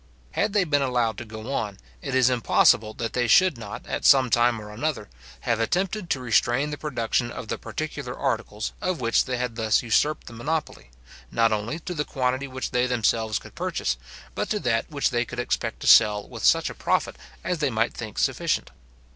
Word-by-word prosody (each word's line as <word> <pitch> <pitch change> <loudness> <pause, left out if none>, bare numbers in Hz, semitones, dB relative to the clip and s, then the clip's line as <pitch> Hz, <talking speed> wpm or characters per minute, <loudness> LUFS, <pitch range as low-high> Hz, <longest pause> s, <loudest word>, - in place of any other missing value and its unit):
Had 200 - 0
they 205 -2 +3
been 145 -4 +1
allowed 120 -5 0
to 120 - -7
go 110 +4 -7
on, 105 -6 -2 0.2
it 135 -2 -3
is 130 -2 +5
impossible 110 -2 +3
that 115 -1 -4
they 125 -1 +1
should 185 - +5
not, 110 -3 -8
at - - -4
some 130 -4 +5
time 120 -1 +3
or 105 0 -9
another, 115 -2 -3 0.3
have 115 -2 0
attempted 185 - -1
to 135 - 0
restrain 125 +4 +1
the 150 - -4
production 120 -4 -1
of 110 - -8
the - - -3
particular 145 -5 -5
articles 110 -1 -2
of 185 -2 -1
which 115 -2 +2
they 130 -1 -2
had 120 -2 -3
thus 110 0 +2
usurped 145 +6 +1
the - - -10
monopoly, 145 - -3 0.4
not 115 -1 +3
only 110 +8 -2
to 180 +2 -6
the 150 -3 -1
quantity 130 0 -1
which 130 -1 -5
they 125 0 +2
themselves 115 -3 +1
could - - -11
purchase, - - -2 0.4
but - - -3
to 210 - 0
that 115 - 0
which 145 -3 0
they 120 -1 +1
could 120 - -9
expect 115 -2 -2
to - - -5
sell 105 -2 +6
with - - -9
such - - +4
a - - -8
profit - - 0 0.3
as 180 -3 -2
they 145 -2 +1
might 115 -1 0
think 110 -3 -7
sufficient. - - 0
120 Hz, 205 wpm, -25 LUFS, 115-145 Hz, 0.4 s, sell